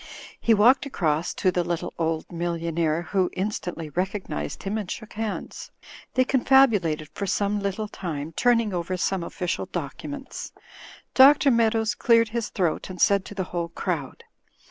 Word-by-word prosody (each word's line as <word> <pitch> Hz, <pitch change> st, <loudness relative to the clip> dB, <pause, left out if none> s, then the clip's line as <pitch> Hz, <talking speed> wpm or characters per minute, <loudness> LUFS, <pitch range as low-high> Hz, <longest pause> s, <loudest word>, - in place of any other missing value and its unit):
He 230 Hz, -, +4 dB
walked 245 Hz, +7 st, +5 dB
across 160 Hz, -, 0 dB
to 185 Hz, -, +2 dB
the 180 Hz, -1 st, 0 dB
little, 170 Hz, -1 st, -3 dB
old 160 Hz, -1 st, -1 dB
millionaire, 170 Hz, -1 st, -1 dB
who 185 Hz, 0 st, 0 dB
in 190 Hz, +3 st, -1 dB
stantly 165 Hz, -7 st, -6 dB
recognized 185 Hz, -, -3 dB
him 205 Hz, +3 st, -2 dB
and 200 Hz, -4 st, -6 dB
shook 220 Hz, -, -7 dB
hands. 220 Hz, 0 st, -5 dB, 0.5 s
They 255 Hz, -, +5 dB
con 265 Hz, -2 st, +1 dB
fabulated 205 Hz, -, +4 dB
for 200 Hz, -, -4 dB
some 205 Hz, +2 st, 0 dB
little 200 Hz, +2 st, -2 dB
time, 160 Hz, -6 st, -5 dB
turning 230 Hz, -4 st, +2 dB
over 180 Hz, +1 st, -2 dB
some 185 Hz, 0 st, -1 dB
offi 180 Hz, +2 st, -5 dB
cial 180 Hz, +2 st, -2 dB
documents. 265 Hz, -, -6 dB, 0.6 s
Dr. 275 Hz, +1 st, +7 dB
Meadows 225 Hz, -2 st, +2 dB
cleared 230 Hz, +1 st, +3 dB
his 230 Hz, 0 st, -3 dB
throat 175 Hz, -2 st, -1 dB
and 185 Hz, -1 st, -8 dB
said 200 Hz, +1 st, +4 dB
to 205 Hz, -, -9 dB
the 190 Hz, -, -1 dB
whole 170 Hz, -1 st, -2 dB
crowd. 165 Hz, -5 st, -4 dB
190 Hz, 165 wpm, -25 LUFS, 170-220 Hz, 0.6 s, Dr